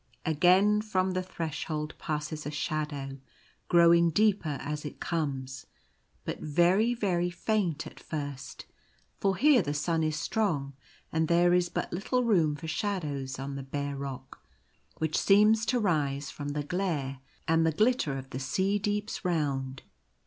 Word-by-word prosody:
Again 185 +7 +4
from 190 -3 0
the 185 0 -1
Threshold 155 -3 -4
passes 150 0 -3
a - - -2
shadow, 150 -2 -3 0.5
growing 170 -1 +6
deeper 190 -5 +2
as 150 +1 -4
it 150 - -7
comes, 135 -5 -3 0.6
but - - -4
very, 180 +10 +3
very 180 -6 0
faint 175 -3 -1
at - - -11
first; 145 -4 -6 0.5
for 195 -1 +1
here 285 +1 +6
the 145 +1 -3
sun 165 +2 0
is 155 -1 0
strong, 155 -5 -1 0.4
and 160 0 +1
there 175 +1 +4
is 180 -1 +3
but - - -3
little 250 +8 0
room 170 -10 +3
for 160 +2 -8
shadows 150 -8 -2
on 135 +1 -5
the 140 - -4
bare 140 +1 -4
rock 135 -1 -7 0.6
which 160 0 -1
seems 215 +2 +5
to 250 - +2
rise 145 -8 0
from 145 -1 -5
the 145 0 -2
glare 145 -6 -2 0.3
and 165 0 +3
the 160 - +3
glitter 210 - +1
of 135 0 -9
the 130 - -4
sea 190 +10 0
deeps 205 +1 -2
round. 140 -7 -1
160 Hz, 150 wpm, -29 LUFS, 145-190 Hz, 0.6 s, growing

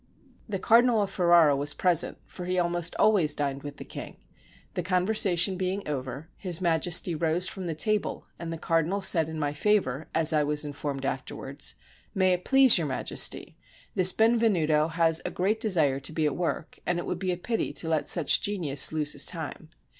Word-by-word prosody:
The 200 - -2
Cardinal 230 +2 +3
of 200 - -5
Ferrara 170 -5 +4
was 145 +1 -2
present, 175 -2 +1
for 180 - -9
he 185 +1 -2
almost 175 -1 0
always 180 -9 +2
dined 140 -1 -3
with 145 0 -9
the - - -9
king: - - -9 0.6
the - - -3
conversation 185 0 +1
being 190 +2 -3
over. 135 +1 -6
His 180 -4 -2
Majesty 170 0 +1
rose 165 +3 0
from 190 -2 -6
the 165 - -4
table, 215 +7 -1
and 170 -1 -6
the 165 - -5
cardinal 165 +4 -1
said 160 -4 +2
in 160 - -7
my 145 -2 -2
favor, 155 -5 -1
as 160 0 +3
I 155 - +2
was 150 +1 +1
informed 145 -1 -5
afterwards: 135 +1 -3 0.4
"May 185 -1 +2
it 180 0 -4
please 265 -7 +7
Your 160 - -2
Majesty, 130 - 0 0.3
this 185 0 +4
Benvenuto 200 -10 +2
has 165 0 +1
a - - -3
great 205 +5 -1
desire 160 - +1
to 140 - -7
be 155 -1 -2
at 150 - -1
work, 170 -1 -4
and 175 - -1
it 175 - -4
would 180 - -4
be 185 -1 -2
a 175 - -3
pity 225 +5 -3
to 165 - -4
let 160 -2 -1
such 165 -5 +4
a - - -15
genius 160 -10 +2
lose 150 -1 0
his - - +2
time." - - -6
170 Hz, 195 wpm, -26 LUFS, 150-185 Hz, 0.6 s, please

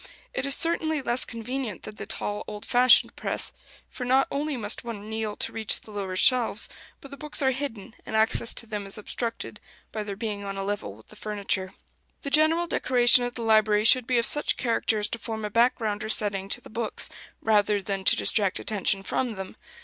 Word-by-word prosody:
It 270 - -2
is 275 - +4
certainly 320 -2 +1
less 240 0 +3
convenient 230 -2 -5
than 215 - -7
the - - -8
tall 205 0 -2
old 210 -1 -7
fashioned 250 0 +5
press; - - -3 0.3
for 250 - -8
not 260 +2 +3
only 290 0 -2
must 210 -2 0
one 220 -3 -7
kneel 220 -1 -3
to - - -1
reach 220 -2 0
the 215 - -15
lower 195 -3 -4
shelves, 235 +1 +3 0.3
but 275 - -12
the 280 - -9
books 300 -1 -1
are 265 - +3
hidden, 250 -5 -5
and - - -6
access 220 +1 +3
to - - 0
them 210 -3 -5
is 195 - -3
obstructed, 230 +2 -5 0.3
by 215 - -4
their 205 -1 -5
being 205 -1 -4
on 195 0 -5
a 195 - -3
level 195 - -4
with 110 - -19
the - - -14
furniture. 200 -2 -3 0.5
The 280 - -4
general 315 +3 +3
decoration 245 -6 +4
of 245 - -5
the 235 - -5
library 215 -1 +3
should 245 +2 +5
be 255 - +2
of 235 - +2
such 295 - +1
character 230 -2 0
as 210 0 +1
to 230 - -5
form 220 -1 -5
a 210 - -5
background 225 -2 +1
or 215 - -5
setting 200 -3 0
to - - -1
the - - -14
books, 225 0 -1 0.3
rather 210 -1 +2
than 195 0 -4
to - - +5
distract 200 -3 +1
attention 195 -2 0
from 240 +2 -2
them. 190 -1 -7
220 Hz, 210 wpm, -26 LUFS, 205-250 Hz, 0.5 s, fashioned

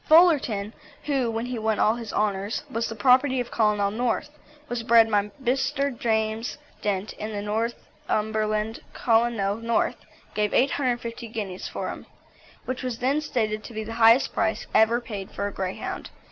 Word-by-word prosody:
Fullerton, 280 - +5 0.3
who, 270 -5 0
when 225 +1 -2
he 250 -2 -3
won 220 -1 +1
all 215 - +4
his 230 -2 -6
honours, 205 +2 -1
was 230 -2 -1
the 225 - -5
property 255 +4 +4
of 245 - -3
Colonel 210 -2 +2
North, 245 +6 -1 0.4
was 240 -3 -2
bred 225 -1 +5
by 205 0 +2
Mr. 270 +2 0
James 220 0 -1 0.2
Dent 205 0 -1
in 210 -1 -4
Northumberland. 215 0 -2
Colonel 225 -4 +2
North 230 0 0 0.4
gave 210 -1 0
850 245 -3 0
guineas 205 -5 -5
for - - -4
him, - - -8 0.6
which 255 0 -3
was 250 -3 -3
then 270 +5 +1
stated 215 -7 -1
to 235 - -10
be 220 - -2
the 225 +1 -6
highest 230 +4 +6
price 220 -1 0
ever 225 +2 +5
paid 205 -5 -6
for 200 - -4
a 205 - -3
Greyhound. 185 -1 -4
225 Hz, 160 wpm, -25 LUFS, 215-245 Hz, 0.6 s, highest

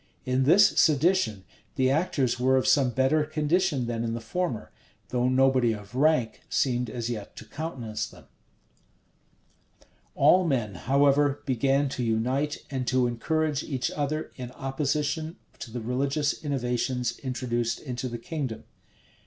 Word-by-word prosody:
In 130 +1 +1
this 185 +8 +7
sedition, 155 - +3 0.3
the 130 0 +2
actors 135 -6 0
were 130 +1 +3
of 130 - +1
some 135 -3 +4
better 135 +5 +2
condition 155 -1 0
than 115 -1 -2
in 115 0 -2
the - - -3
former; 120 +2 -3 0.4
though 125 0 +1
nobody 130 -2 +3
of 105 0 -10
rank 130 -4 +2
seemed 125 -2 0
as 115 0 -4
yet 110 -4 -5
to - - -10
countenance 135 -8 -5
them.[*] - - -16 1.9
All 185 +1 +5
men, 125 - 0
however, 140 +6 +2
began 135 +2 +2
to 130 - -3 0.2
unice 135 +5 -1
and 130 -2 -3
to 130 0 +2
encourage 150 +5 0
each 130 -5 -2
other 155 +1 -2
in 125 -2 -6
opposition 145 +4 -2 0.2
to - - -7
the 120 +1 -5
religious 140 +6 -1
innovations 125 -3 -1
introduced 120 -3 -2
into 125 -1 -5
the 120 - -5
kingdom. 130 -2 -5
130 Hz, 140 wpm, -27 LUFS, 120-145 Hz, 1.9 s, this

